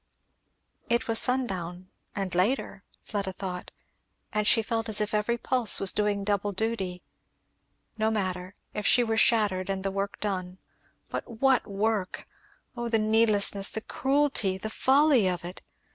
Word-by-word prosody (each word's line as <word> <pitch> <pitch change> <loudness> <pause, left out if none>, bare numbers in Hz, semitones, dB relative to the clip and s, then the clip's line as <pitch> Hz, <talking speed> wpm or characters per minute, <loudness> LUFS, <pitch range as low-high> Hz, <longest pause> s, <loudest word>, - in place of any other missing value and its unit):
It 235 +1 +1
was 225 -1 +4
sundown, 185 -8 -1 0.3
and 195 -2 -3
later, 195 +10 0 0.2
Fleda 200 -3 -4
thought, 180 -2 -6 0.6
and 210 -1 0
she 225 - +5
felt 225 0 -2
as 215 - +1
if 210 0 -2
every 215 +3 0
pulse 245 -2 +3
was 195 - +3
doing 205 -1 0
double 205 0 -1
duty. 190 -4 -3 1.0
No 220 0 +2
matter 185 -3 -3 0.2
if 210 - -2
she 245 - +5
were 225 -1 -1
shattered 205 -5 +2
and 190 -1 -2
the 195 - 0
work 200 +1 -4
done. 185 -3 -4 0.5
But - - -5
what 265 -1 +3
work! 205 -1 -2 0.5
Oh 235 -1 -3
the 225 - +2
needlessness, 215 -2 +3
the 220 - -4
cruelty, 270 -8 +1
the 220 +3 -6
folly 270 -5 +3
of 175 -2 -2
it! 180 +1 -8
210 Hz, 150 wpm, -27 LUFS, 190-225 Hz, 1.0 s, she